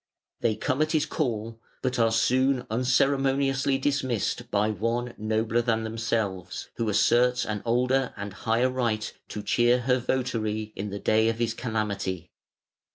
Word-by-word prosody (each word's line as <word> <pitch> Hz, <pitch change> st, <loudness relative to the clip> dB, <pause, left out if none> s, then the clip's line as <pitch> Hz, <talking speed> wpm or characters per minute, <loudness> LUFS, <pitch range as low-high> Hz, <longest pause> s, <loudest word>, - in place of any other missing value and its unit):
They 110 Hz, -, +1 dB
come 130 Hz, +6 st, -1 dB
at 155 Hz, +1 st, +1 dB
his 155 Hz, -2 st, +2 dB
call, 115 Hz, -5 st, -3 dB, 0.2 s
but 125 Hz, -2 st, 0 dB
are 115 Hz, -1 st, +4 dB
soon 130 Hz, +3 st, +2 dB
unceremoniously 135 Hz, +2 st, +2 dB
dismissed 135 Hz, -5 st, -1 dB
by 105 Hz, +1 st, +1 dB
one 115 Hz, +4 st, -2 dB
nobler 110 Hz, +2 st, 0 dB
than 115 Hz, -2 st, 0 dB
themselves, 110 Hz, -5 st, -3 dB
who 115 Hz, -2 st, 0 dB
asserts 125 Hz, +4 st, +3 dB
an 105 Hz, -2 st, -3 dB
older 125 Hz, +2 st, +2 dB
and 100 Hz, -1 st, -5 dB
higher 115 Hz, +6 st, +1 dB
right 115 Hz, -4 st, -1 dB
to 105 Hz, -, -6 dB
cheer 120 Hz, +3 st, +3 dB
her 125 Hz, +1 st, +2 dB
votary 110 Hz, -4 st, -2 dB
in 105 Hz, +2 st, -4 dB
the 100 Hz, -, -5 dB
day 110 Hz, +2 st, +2 dB
of 115 Hz, -, -2 dB
his 115 Hz, -1 st, 0 dB
calamity. 105 Hz, -7 st, -3 dB
115 Hz, 150 wpm, -27 LUFS, 110-130 Hz, 0.2 s, are